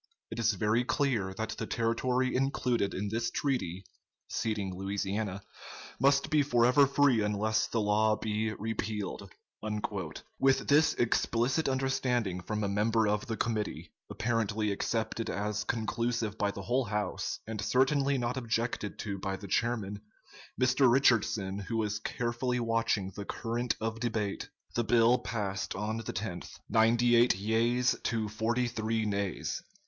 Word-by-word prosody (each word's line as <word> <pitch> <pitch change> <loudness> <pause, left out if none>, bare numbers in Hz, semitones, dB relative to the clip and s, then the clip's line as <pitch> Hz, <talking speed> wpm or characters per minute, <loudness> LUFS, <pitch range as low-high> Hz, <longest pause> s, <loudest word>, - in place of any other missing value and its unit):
It 115 - -5
is 115 -1 +3
very 105 +5 +1
clear 125 -8 0
that 110 +1 -3
the - - -3
territory 125 +3 0
included 125 -6 0
in 100 +2 -2
this 115 +2 -1
treaty 100 - -2 0.4
[ceding 105 -4 -2
Louisiana] 100 +1 -3 0.6
must 140 +2 +3
be 155 -1 +5
forever 125 +1 +4
free 140 -4 +3
unless 105 +1 +1
the 115 - -1
law 105 +1 +3
be 110 0 -1
repealed." 110 -2 -4 1.1
With 135 0 +3
this 150 +2 +4
explicit 120 +5 +1
understanding 130 -7 0
from 105 +4 -3
a - - +1
member 110 +2 +2
of 105 +4 0
the 115 -2 -3
committee, 110 -3 -2 0.2
apparently 110 -2 0
accepted 110 +2 -2
as 105 +1 -2
conclusive 115 -1 -1
by 105 -2 0
the 100 0 -6
whole 125 +4 +1
House, 105 -2 -2
and 110 -2 -4
certainly 135 +5 +2
not 125 +1 -1
objected 115 -3 -2
to 100 -2 -4
by 95 +1 -2
the 100 +1 -9
chairman, 105 -1 -1 0.6
Mr. 130 0 +4
Richardson, 110 -6 +2
who 115 +3 -3
was 105 -1 -1
carefully 120 +3 -2
watching 115 -4 0
the 100 +1 -7
current 120 +3 -2
of 115 0 -3
debate, 110 -4 -2 0.2
the 120 - +1
bill 120 +1 +4
passed 100 -4 -3
on 105 +3 -2
the 115 - -5
10th, - - -5
ninety 120 +2 +4
eight 120 -2 +5
yeas 115 +5 +2
to 110 -2 0
forty 115 +4 0
three 110 -1 -1
nays. 100 -2 -2
115 Hz, 145 wpm, -30 LUFS, 105-120 Hz, 1.1 s, be